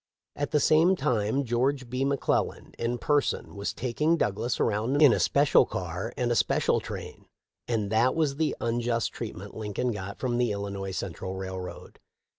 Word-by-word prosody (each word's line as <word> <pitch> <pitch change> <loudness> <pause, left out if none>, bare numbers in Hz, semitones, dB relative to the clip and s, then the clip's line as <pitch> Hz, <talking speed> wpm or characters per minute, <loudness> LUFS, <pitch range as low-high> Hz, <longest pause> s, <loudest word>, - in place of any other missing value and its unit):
At 145 - -2
the 150 - +2
same 160 +6 +5
time 125 - 0
George 130 +2 0
B. 125 +2 -2
McClellan 140 0 -1
in 120 +1 -1
person 145 -4 0
was 100 0 -2
taking 150 +7 0
Douglas 110 0 -1
around 115 +6 +1
in 145 -6 +7
a - - +1
special 140 0 +4
car 90 +5 -4
and 120 -1 +1
special - - +2
train; - - -8 0.4
and 110 -4 -1
that 115 +4 +3
was 150 -4 +1
the 160 -1 0
un 120 0 0
just 115 -1 -1
treatment - - -7
Lincoln 110 +3 -2
got 100 -2 -6
from 125 -2 -1
the 120 -3 +2
Illinois 100 -1 -4
Central 95 0 -4
railroad. 95 -1 -7
120 Hz, 165 wpm, -27 LUFS, 100-140 Hz, 0.4 s, in